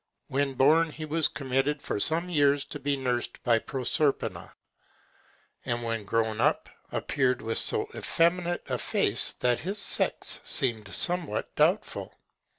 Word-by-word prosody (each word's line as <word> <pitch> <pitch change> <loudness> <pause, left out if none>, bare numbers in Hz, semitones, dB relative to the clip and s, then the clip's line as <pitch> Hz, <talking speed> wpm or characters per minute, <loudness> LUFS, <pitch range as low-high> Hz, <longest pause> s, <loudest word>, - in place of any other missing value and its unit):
When 135 0 -1
born, 160 +6 +4
he 155 0 -7
was 155 +1 +1
committed, 135 +1 -1
for 105 - -3
some 165 - +1
years, 145 -4 +2
to 145 - -8
be 140 0 -1
nursed 125 -2 -3
by 120 -2 +3
Proserpina; 135 +4 -2 1.1
and 120 0 -2
when 115 -2 -2
grown 110 +1 0
up, - - +1 0.2
appeared 130 -3 0
with 115 0 +3
so - - +5
effeminate 175 +1 0
a - - -2
face, - - -1
that 125 -1 +2
his 195 +6 -4
sex - - 0
seemed 110 -6 -1
somewhat 175 -11 0
doubtful. - - 0
135 Hz, 140 wpm, -27 LUFS, 120-155 Hz, 1.1 s, so